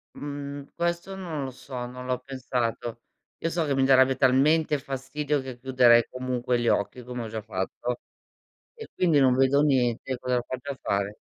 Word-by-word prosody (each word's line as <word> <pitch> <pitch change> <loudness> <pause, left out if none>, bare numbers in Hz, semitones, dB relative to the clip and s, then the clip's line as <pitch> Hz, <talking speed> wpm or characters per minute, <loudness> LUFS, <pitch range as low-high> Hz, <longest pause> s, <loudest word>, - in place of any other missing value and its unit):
Mhmm, 145 -1 -6
questo 170 +3 -2
non 170 -7 -4
lo 130 - -4
so, 125 -1 -7
non 125 +1 -8
l'ho 125 -1 -1
pensato. 125 -3 -3 0.4
Io 165 - -1
so 165 -1 0
che 140 -2 0
mi 135 - +2
darebbe 130 0 +5
talmente 145 +4 +3
fastidio 140 +2 -2
che 130 -2 -8
chiuderei 125 -2 +5
comunque 125 -1 -1
gli 120 - -1
occhi 105 +5 0
come 125 0 -5
ho - - -5
già 110 0 -5
fatto. 110 +4 -3 0.7
E 455 -2 -10
quindi 165 -5 +3
non 130 -2 +5
vedo 135 +2 +4
niente, 130 -3 +1
cosa 125 0 0
faccio 130 +3 -5
a 135 - -7
fare? 100 +1 -1
130 Hz, 175 wpm, -26 LUFS, 125-145 Hz, 0.7 s, darebbe